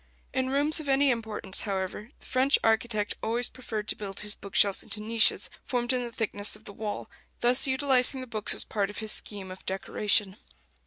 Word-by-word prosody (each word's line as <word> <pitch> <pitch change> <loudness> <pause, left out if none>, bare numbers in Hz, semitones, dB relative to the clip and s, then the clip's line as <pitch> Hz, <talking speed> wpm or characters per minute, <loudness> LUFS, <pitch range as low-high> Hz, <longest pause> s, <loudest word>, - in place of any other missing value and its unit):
In 260 -1 0
rooms 290 +4 +4
of 300 -3 -6
any 270 0 +4
importance, 220 -5 -1
however, 195 +2 -4
the - - -18
French 260 +2 +3
architect 220 -2 +1
always 240 +2 +1
preferred 220 -4 -5
to - - +1
build 195 -2 -7
his 210 0 -5
book 200 - -12
shelves 200 -2 +4
into 210 - -5
niches 220 +1 +2 0.2
formed 245 0 -1
in 250 -1 0
the 240 - -6
thickness 210 -2 0
of - - -14
the 200 - -10
wall, 210 0 -5 0.3
thus 245 +3 +4
utilizing 265 -1 +2
the 255 - -6
books 220 -4 +2
as - - +3
part 205 -2 -2
of 205 - -9
his 220 -1 -2
scheme 195 -3 -1
of 185 - -11
decoration. 195 +1 +1
220 Hz, 200 wpm, -28 LUFS, 205-255 Hz, 0.3 s, rooms